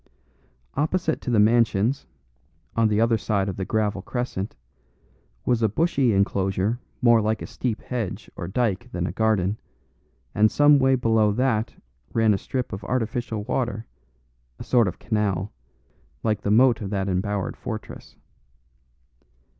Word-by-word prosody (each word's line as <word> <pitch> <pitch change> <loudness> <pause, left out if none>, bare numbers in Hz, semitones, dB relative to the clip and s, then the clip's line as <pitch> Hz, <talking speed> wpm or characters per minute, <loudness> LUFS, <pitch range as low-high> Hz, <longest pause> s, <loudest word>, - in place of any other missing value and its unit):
Opposite 160 +2 0
to - - -4
the 120 - +2
mansions, 115 +2 +2 0.7
on 115 -1 +3
the 105 0 +1
other 115 0 +3
side 100 -2 0
of 95 - -3
the 95 - -3
gravel 105 -2 0
crescent, 115 -3 -4 0.9
was 120 -2 +2
a 110 - +3
bushy 140 - +2
enclosure 100 +2 0 0.2
more 120 -2 +6
like 110 +1 -1
a - - -4
steep 120 -4 -3
hedge 115 -7 -4
or - - -5
dyke 115 +1 -1
than 90 -1 -2
a 80 - -2
garden, 105 -1 +1 0.7
and 110 +1 +4
some 145 +2 +5
way 135 0 +4
below 115 -4 +2
that 115 -1 0 0.4
ran 110 -2 +4
a 95 - -1
strip 130 -4 -4
of 100 - -6
artificial 115 -3 -2
water, 115 -1 -2 0.7
a - - -7
sort 120 -4 +3
of 90 - -4
canal, 105 -3 -1 0.7
like 105 -2 0
the - - -2
moat 120 +2 +4
of 100 - -4
that 95 -1 -1
embowered 95 +1 -1
fortress. - - -8
110 Hz, 145 wpm, -24 LUFS, 100-120 Hz, 0.9 s, more